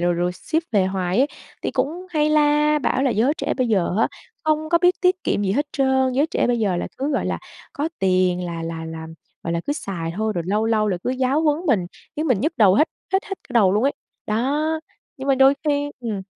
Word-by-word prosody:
rồi 175 Hz, 0 st, +2 dB
rồi 175 Hz, +1 st, 0 dB
ship 320 Hz, -, -2 dB
về 195 Hz, -3 st, +3 dB
hoài 190 Hz, 0 st, -1 dB
ấy 270 Hz, -, +5 dB, 0.4 s
thì -, -, -1 dB
cũng 315 Hz, +8 st, -2 dB
hay 305 Hz, -2 st, +2 dB
la 300 Hz, 0 st, +3 dB
bảo 265 Hz, -1 st, 0 dB
là 265 Hz, -, +2 dB
"Giới 230 Hz, +6 st, +2 dB
trẻ 280 Hz, 0 st, -2 dB
bây 255 Hz, -2 st, +1 dB
giờ 190 Hz, -5 st, +1 dB
á -, -, +3 dB, 0.4 s
không 310 Hz, 0 st, +1 dB
có 340 Hz, +1 st, +4 dB
biết 355 Hz, +1 st, +4 dB
tiết 370 Hz, 0 st, +2 dB
kiệm 205 Hz, -, 0 dB
gì 190 Hz, -1 st, +1 dB
hết 290 Hz, +5 st, 0 dB
trơn, 265 Hz, -1 st, +2 dB
giới 280 Hz, +4 st, +2 dB
trẻ -, -, 0 dB
bây 245 Hz, -1 st, +1 dB
giờ 200 Hz, -5 st, +1 dB
là -, -, -2 dB
cứ, 280 Hz, +3 st, -1 dB
gọi -, -, 0 dB
là, -, -, -1 dB, 0.3 s
có 295 Hz, +3 st, -2 dB
tiền 185 Hz, -1 st, +2 dB
là 170 Hz, -1 st, -5 dB
là 165 Hz, 0 st, -5 dB
là, 160 Hz, 0 st, -7 dB, 0.4 s
gọi 165 Hz, -, -2 dB
là, 170 Hz, -, 0 dB
cứ 290 Hz, -, +1 dB
xài 175 Hz, -, -4 dB
thôi." 220 Hz, 0 st, 0 dB
Rồi 170 Hz, -, -1 dB
lâu 210 Hz, +3 st, +1 dB
lâu 215 Hz, -2 st, +2 dB
là 185 Hz, -, 0 dB
cứ 250 Hz, -, 0 dB
giáo 260 Hz, +3 st, +1 dB
huấn 300 Hz, -2 st, +2 dB
mình, 195 Hz, -10 st, +2 dB, 0.3 s
khiến 310 Hz, -, -1 dB
mình 250 Hz, -9 st, +2 dB
nhức 310 Hz, +7 st, 0 dB
đầu 195 Hz, -3 st, +6 dB
hết 305 Hz, +8 st, +4 dB, 0.2 s
hết 385 Hz, +1 st, +2 dB
hết 390 Hz, -, -4 dB
cả 250 Hz, -, -11 dB
đầu 195 Hz, -5 st, +5 dB
luôn 210 Hz, -, +2 dB
ấy. 275 Hz, +2 st, +2 dB, 0.3 s
Đó, 290 Hz, +8 st, 0 dB, 0.4 s
nhưng 270 Hz, +1 st, -6 dB
mà 275 Hz, -, +5 dB
đôi 270 Hz, +1 st, +6 dB
khi 290 Hz, -1 st, 0 dB
ừm. 215 Hz, -5 st, -3 dB
255 Hz, 250 wpm, -22 LUFS, 190-295 Hz, 0.4 s, đầu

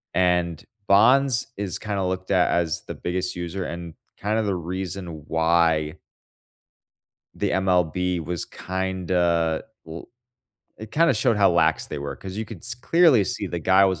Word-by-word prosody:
And 90 Hz, -3 st, +1 dB, 0.2 s
Bonds 125 Hz, +5 st, +4 dB
is 100 Hz, -3 st, -3 dB
kinda 100 Hz, -3 st, -3 dB
looked 95 Hz, +1 st, -3 dB
at 90 Hz, -2 st, +3 dB
as 85 Hz, -3 st, 0 dB
the -, -, -5 dB
biggest 90 Hz, +1 st, -3 dB
user 90 Hz, +2 st, -4 dB
and 85 Hz, -2 st, -6 dB, 0.2 s
kinda 110 Hz, +2 st, 0 dB
the 100 Hz, -3 st, 0 dB
reason 90 Hz, -2 st, -5 dB
why 80 Hz, -1 st, +2 dB, 1.4 s
the -, -, -1 dB
MLB 90 Hz, -1 st, +1 dB
was 85 Hz, 0 st, -3 dB
kinda 90 Hz, -3 st, -1 dB, 0.2 s
l 80 Hz, +1 st, -8 dB, 0.7 s
it 110 Hz, 0 st, -9 dB
kinda 165 Hz, +2 st, +4 dB
showed 110 Hz, 0 st, +2 dB
how 100 Hz, -2 st, +5 dB
lax 80 Hz, -2 st, +2 dB
they 75 Hz, -, -5 dB
were 70 Hz, 0 st, -5 dB
'cause 95 Hz, +1 st, -8 dB
you 110 Hz, -, -2 dB
could -, -, -9 dB
s 115 Hz, 0 st, -6 dB
clearly 150 Hz, -, +4 dB
see -, -, -3 dB
the 85 Hz, -, -4 dB
guy 95 Hz, +3 st, +4 dB
was 95 Hz, -4 st, 0 dB
90 Hz, 155 wpm, -24 LUFS, 85-100 Hz, 1.4 s, how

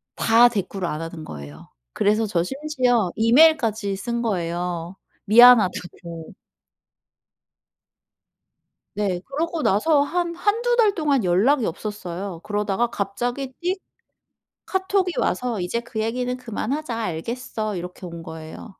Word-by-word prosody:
다 235 Hz, +2 st, +5 dB
대꾸를 195 Hz, -4 st, -3 dB
안 155 Hz, 0 st, -3 dB
하는 165 Hz, -1 st, -7 dB
거예요. 75 Hz, 0 st, -10 dB, 0.2 s
그래서 215 Hz, -, +1 dB
저 180 Hz, -5 st, 0 dB
심지어 255 Hz, -, 0 dB
이메일까지 230 Hz, -5 st, +4 dB
쓴 235 Hz, +3 st, -3 dB
거예요 175 Hz, -3 st, -2 dB, 0.3 s
미안하다고. 190 Hz, -7 st, +4 dB, 2.6 s
네. 190 Hz, -4 st, -1 dB
그러고 320 Hz, +3 st, -2 dB
나서 285 Hz, +9 st, +3 dB
한 340 Hz, +2 st, -2 dB
1-2 470 Hz, +5 st, +1 dB
달 430 Hz, -4 st, +4 dB
동안 285 Hz, -, +1 dB
연락이 220 Hz, +9 st, +3 dB
없었어요. 185 Hz, -2 st, -5 dB
그러다가 210 Hz, +2 st, 0 dB
갑자기 245 Hz, +7 st, -3 dB
띡 365 Hz, +3 st, 0 dB, 0.9 s
카톡이 380 Hz, -1 st, 0 dB
와서 240 Hz, -5 st, -1 dB
"이제 180 Hz, +7 st, -2 dB
그 225 Hz, -2 st, -5 dB
얘기는 250 Hz, +3 st, -1 dB
그만하자 250 Hz, +2 st, -4 dB
알겠어." 215 Hz, +2 st, -4 dB
이렇게 180 Hz, +1 st, -7 dB
온 170 Hz, -1 st, -8 dB
거예요. 160 Hz, +6 st, -9 dB
220 Hz, 260 characters per minute, -23 LUFS, 180-270 Hz, 2.6 s, 다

